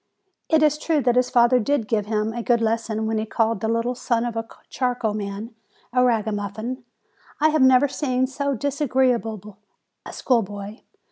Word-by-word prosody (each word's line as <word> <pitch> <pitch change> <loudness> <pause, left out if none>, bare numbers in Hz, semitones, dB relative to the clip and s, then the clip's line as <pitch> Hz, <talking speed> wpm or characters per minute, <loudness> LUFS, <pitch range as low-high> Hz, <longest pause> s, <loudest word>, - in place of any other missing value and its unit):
It 315 -1 +4
is 300 0 +3
true 310 -2 +1
that 245 0 +2
his 250 0 +2
father 245 0 +4
did 245 -1 0
give 210 -1 -1
him 215 0 -1
a 240 - -4
good 235 0 +2
lesson 225 -1 -1
when 220 0 -1
he 215 - -2
called 225 -1 0
the 220 - -1
little 230 +2 0
son 240 -1 -1
of 240 - -3
the 225 0 -4 0.2
charcoal 245 -4 -1
man 210 +2 -5 0.4
a 250 0 +4
ragamuffin. 220 +1 -2 0.6
I 310 +1 +4
have 310 -1 +1
never 260 +1 +6
seen 260 -2 -1
so 280 +1 -2
dis 285 +4 -3
agreeable 230 -7 0 0.5
a - - -9
schoolboy 205 -3 -2
235 Hz, 180 wpm, -23 LUFS, 220-255 Hz, 0.6 s, never